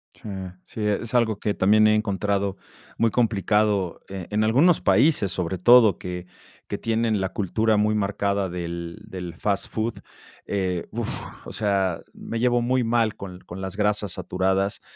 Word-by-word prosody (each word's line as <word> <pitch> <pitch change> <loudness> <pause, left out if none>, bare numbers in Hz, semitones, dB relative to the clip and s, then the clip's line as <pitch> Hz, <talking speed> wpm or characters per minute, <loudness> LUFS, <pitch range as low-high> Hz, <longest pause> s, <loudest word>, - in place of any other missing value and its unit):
Sí, - - -10 0.4
sí, 110 - -8
es 110 +3 -2
algo 115 -4 +2
que 105 - 0
también 110 +3 +4
he 110 - +4
encontrado 100 -2 -1 0.4
muy 115 -1 +2
complicado, 105 -4 +1
eh, 95 -3 -6
en 105 +1 +1
algunos 140 +10 +4
países, 140 - +3
sobre 90 0 -2
todo, 110 0 +6
que 90 0 -6 0.4
que - - -3
tienen 115 -1 0
la 95 0 -2
cultura 110 +3 +1
muy 105 +1 +2
marcada 100 -1 0
del 85 -1 -5
del 90 -3 -7
fast 100 +3 -1
food. 110 +1 -2 0.5
Eh, 95 -3 -2
uf, - - -3 0.4
o - - -7
sea, 95 -4 0
me 115 - -5
llevo 120 0 +2
muy 125 +1 +1
mal 115 -2 +1
con 90 -2 -8
con 90 - -9
las 95 0 -5
grasas 105 -2 0
saturadas, 95 +2 -1
105 Hz, 160 wpm, -24 LUFS, 95-110 Hz, 0.5 s, todo